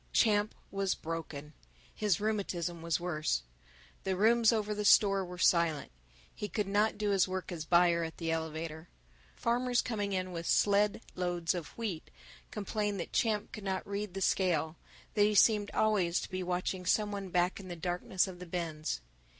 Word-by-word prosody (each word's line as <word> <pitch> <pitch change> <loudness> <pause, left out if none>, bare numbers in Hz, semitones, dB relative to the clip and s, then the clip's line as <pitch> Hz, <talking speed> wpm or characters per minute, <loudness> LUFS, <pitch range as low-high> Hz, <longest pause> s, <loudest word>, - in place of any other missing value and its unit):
Champ 210 -2 +3 0.2
was 195 -1 0
broken. 155 -2 -6 0.4
His 210 -6 +1
rheumatism 185 -5 -2
was 165 0 0
worse. 155 - -1 0.6
The 190 -1 0
rooms 225 +3 +5
over 215 -2 0
the 210 0 -3
store 200 -1 +5
were 180 0 -8
silent. 170 -4 +2 0.4
He 210 - -4
could 210 - -1
not 210 +2 +2
do 210 -1 0
his 195 -1 +3
work 185 0 -4
as 160 -3 -5
buyer 170 0 +4
at 160 0 -6
the 165 -1 -2
elevator. 160 0 -4 0.5
Farmers 245 +1 +1
coming 205 -4 -2
in 185 -1 -2
with 170 -1 -5
sled 205 +1 +3
loads 175 -1 -1
of 175 -3 -4
wheat 205 -9 -4 0.4
complained 210 -1 -2
that 170 - -5
Champ 215 -2 +1
could 215 - -8
not 190 -1 -2
read 200 -1 -4
the 195 - -3
scale, 170 -4 +1 0.4
that 210 - +1
he 210 +1 +4
seemed 205 0 +5
always 195 -6 +2
to - - -7
be 185 0 -2
watching 180 +1 -2
some 210 +3 +2
one 200 -2 -5
back 180 +2 +1
in 190 - -9
the 175 - -5
darkness 180 +2 0
of 180 -2 -8
the 180 - -8
bins. 160 - -3
185 Hz, 175 wpm, -32 LUFS, 170-210 Hz, 0.6 s, rooms